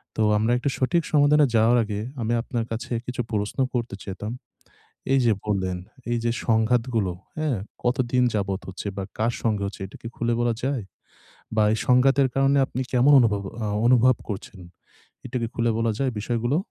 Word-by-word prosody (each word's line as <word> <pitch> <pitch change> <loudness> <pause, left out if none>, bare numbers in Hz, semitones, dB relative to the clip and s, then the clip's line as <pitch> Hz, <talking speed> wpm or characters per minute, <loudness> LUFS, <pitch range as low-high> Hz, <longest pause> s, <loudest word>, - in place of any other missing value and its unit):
তো 110 - -1 0.2
আমরা 110 +3 +1
একটা 130 +3 -1
সঠিক 165 +6 +1
সমাধানে 150 0 +5
যাওয়ার 115 +2 +5
আগে 105 -1 -4 0.2
আমি 115 +1 0
আপনার 120 -2 -3
কাছে 115 +2 -5
কিছু 125 0 -3
প্রশ্ন 105 +4 -2
করতে 120 -4 -2
যেতাম। 105 +3 -5 0.8
এই 135 - +5
যে 115 - +5
বললেন 95 -3 -1 0.3
এই 120 - +1
যে 120 - +1
সংঘাতগুলো, 115 -3 +1 0.3
হ্যাঁ? 150 -7 0 0.3
কতদিন 125 0 +1
যাবৎ 100 -2 -1
হচ্ছে 95 +2 -6
বা, 95 - -2
কার 115 +2 +1
সঙ্গে 105 -3 0
হচ্ছে 100 0 -6
এটা 95 - -12
কি 115 - -6
খুলে 120 0 0
বলা 120 -1 +2
যায়? 130 -5 -1 0.7
বা 110 - +4
এই - - 0
সংঘাতের 135 +2 +4
কারণে 135 +1 +3
আপনি 130 - -4
কেমন 130 +3 +4
অনুভবব 105 -4 +1 0.2
আ - - -1 0.2
অনুভব 125 0 +5
করছেন? 100 -1 -6 0.7
এটা 130 - -8
কি 115 - -1
খুলে 115 -1 +1
বলা 115 -1 +1
যায় 135 -2 +1
বিষয়গুলো? 120 +6 0
120 Hz, 175 wpm, -24 LUFS, 105-130 Hz, 0.8 s, সমাধানে